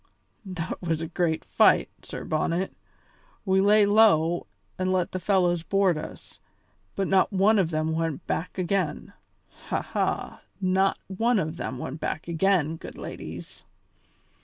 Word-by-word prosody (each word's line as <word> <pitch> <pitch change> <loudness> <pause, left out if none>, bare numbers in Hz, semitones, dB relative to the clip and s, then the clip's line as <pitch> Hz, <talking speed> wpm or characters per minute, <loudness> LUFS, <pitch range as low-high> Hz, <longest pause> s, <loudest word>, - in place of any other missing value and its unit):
That 180 -2 -5
was 165 -3 -1
a 165 - -3
great 165 -1 -1
fight, - - +4
Sir - - -7
Bonnet; 170 +4 -1 0.7
we 190 -1 +3
lay 205 +1 +5
low 200 -6 +4 0.3
and 185 0 0
let 185 -2 0
the 185 - -3
fellows 180 -2 +2
board 195 0 +2
us, 155 - -9 0.5
but 195 -1 -1
not 190 +2 +3
one 200 +2 +4
of 175 -4 +2
them 155 0 -1
went 165 -2 -2
back 180 - -3
again. 185 +1 -1 0.5
Ha! - - -1
ha! - - -2 0.2
Not 190 0 +2
one 225 +5 +1
of 160 -3 -2
them 130 - -4
went 130 +4 -6
back 160 - -3
again, 165 -2 +1
good - - -10
ladies." - - -8
180 Hz, 145 wpm, -26 LUFS, 165-195 Hz, 0.7 s, lay